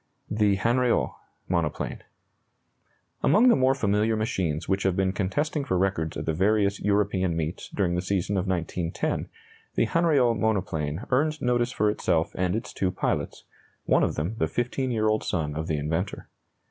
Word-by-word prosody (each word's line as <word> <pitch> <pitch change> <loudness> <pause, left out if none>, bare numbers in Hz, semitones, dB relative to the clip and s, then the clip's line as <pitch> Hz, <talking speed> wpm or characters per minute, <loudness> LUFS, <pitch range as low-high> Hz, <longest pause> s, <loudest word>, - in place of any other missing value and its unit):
THE 105 -2 +3
HANRIOT 120 +4 +2 0.4
MONOPLANE. 85 -4 -2 1.2
Among 240 +5 +5
the - - +6
more 130 0 +3
familiar 110 -2 +1
machines 95 -8 -1
which 95 0 +1
have 95 -1 +1
been 95 0 +1
contesting 145 - -1
for 95 -8 0
records 90 -4 0
at - - -4
the 80 - 0
various 100 +3 +2
European 100 -4 +1
meets 80 +2 -4
during 95 -4 0
the 90 - 0
season 95 +1 -1
of 95 0 -1
1910, 85 -2 -2 0.5
the - - +3
Hanriot 140 -5 +2
monoplane 90 -6 -1
earned 155 +4 +2
notice 120 0 +1
for 105 - +1
itself 85 -6 +1
and 90 +1 0
its 115 - -4
two 95 - 0
pilots, - - -2 0.4
one - - +3
of - - +1
them 85 +8 -2
the - - +2
fifteen 125 +2 -2
year 110 -3 +1
old 110 0 +1
son 75 -5 -1
of 80 +1 -3
the 80 -4 0
inventor. 80 +6 -3
100 Hz, 165 wpm, -26 LUFS, 90-115 Hz, 1.2 s, the